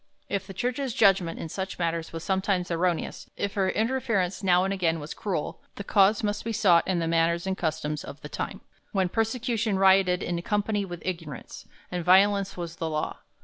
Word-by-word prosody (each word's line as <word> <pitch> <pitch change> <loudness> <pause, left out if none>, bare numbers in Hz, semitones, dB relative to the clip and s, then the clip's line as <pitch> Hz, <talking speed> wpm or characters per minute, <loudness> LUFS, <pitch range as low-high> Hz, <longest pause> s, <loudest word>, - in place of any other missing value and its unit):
If 195 -1 -2
the 195 - -8
Church's 250 +3 -2
judgment 195 -5 +4
in - - -4
such 190 +4 -5
matters 165 -1 -2
was 165 0 -6
sometimes 190 -2 0
erroneous; 170 0 -1
if 200 - -2
her 190 -2 +1
interference 220 -6 0
now 180 -1 +4
and 195 +1 0
again 165 -4 0
was 150 +1 -6
cruel, 185 -7 -3
the 200 - -6
cause 200 +2 +4
must 205 0 -1
be 230 - -3
sought 185 -6 +4
in 185 - +1
the 165 -1 0
manners 170 +1 +2
and 190 0 -1
customs 155 -3 -2
of 145 - -9
the 150 - -7
time, - - -4 0.3
when 190 -3 +1
persecution 225 -1 0
rioted 190 -1 +4
in 175 -1 -2
company 205 +1 0
with 175 -2 -8
ignorance, 165 -8 -6 0.2
and 180 -1 -2
violence 195 +2 +4
was 170 -1 -5
the 165 - -2
law. 155 -1 -3
190 Hz, 190 wpm, -27 LUFS, 170-200 Hz, 0.3 s, judgment